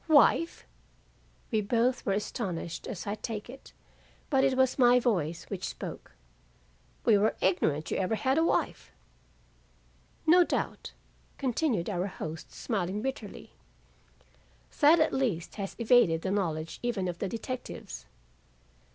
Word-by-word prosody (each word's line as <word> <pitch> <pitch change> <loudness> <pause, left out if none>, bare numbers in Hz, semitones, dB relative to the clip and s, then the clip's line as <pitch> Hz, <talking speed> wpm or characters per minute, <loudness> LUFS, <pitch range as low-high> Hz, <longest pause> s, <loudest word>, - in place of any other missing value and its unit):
"Wife!" 320 +2 +4 0.9
We 220 -2 +2
both 240 +4 +1
were 195 - +3
astonished 185 -5 -3
as 205 -8 -5
I 205 - -2
take 215 +1 -5
it, 270 - -13 0.6
but 270 -2 +4
it 270 -1 +2
was 260 0 +2
my 245 0 +6
voice 175 - 0
which 190 -2 -6
spoke. - - -8 0.9
"We 215 -3 +5
were 215 +2 +2
ignorant 160 -5 +1
you - - 0
ever 190 +3 0
had 265 +6 +1
a - - +3
wife." 330 - 0 1.3
"No 355 +3 +7
doubt," - - -3 0.4
continued 250 - 0
our 185 -2 -1
host 160 -4 -7
smiling 200 -1 -2
bitterly, 265 -6 -5 1.3
"that 310 +3 +7
at 315 - +2
least 220 -11 -1
has 195 - -5
evaded 230 -9 +4
the 190 - -1
knowledge 165 -5 -2
even 225 -6 -1
of 175 -1 -4
the 195 - -2
detectives." 220 - -6
215 Hz, 135 wpm, -29 LUFS, 180-255 Hz, 1.3 s, No